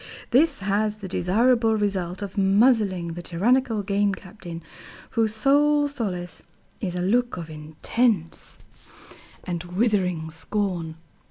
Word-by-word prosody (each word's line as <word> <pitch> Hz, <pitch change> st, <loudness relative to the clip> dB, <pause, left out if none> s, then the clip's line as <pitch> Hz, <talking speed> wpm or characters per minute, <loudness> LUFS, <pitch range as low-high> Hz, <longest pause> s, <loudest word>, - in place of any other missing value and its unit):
This 280 Hz, 0 st, +4 dB
has 205 Hz, +1 st, 0 dB
the 205 Hz, -2 st, -8 dB
desirable 225 Hz, +5 st, +2 dB
result 195 Hz, -2 st, -2 dB
of 200 Hz, -1 st, -7 dB
muzzling 200 Hz, -3 st, +3 dB
the 170 Hz, +1 st, -6 dB
tyrannical 220 Hz, +6 st, +1 dB
Game 200 Hz, 0 st, +1 dB
Captain, 175 Hz, -4 st, -10 dB, 0.5 s
whose 220 Hz, -2 st, +1 dB
sole 290 Hz, +4 st, +3 dB
solace 180 Hz, -, -4 dB, 0.4 s
is 180 Hz, -5 st, -3 dB
a 180 Hz, -, -2 dB
look 240 Hz, +3 st, +1 dB
of 165 Hz, -2 st, -7 dB
intense 165 Hz, +5 st, -1 dB, 0.9 s
and 175 Hz, -2 st, -3 dB
withering 180 Hz, -4 st, 0 dB
scorn. 170 Hz, -1 st, -2 dB
200 Hz, 115 wpm, -24 LUFS, 175-230 Hz, 0.9 s, This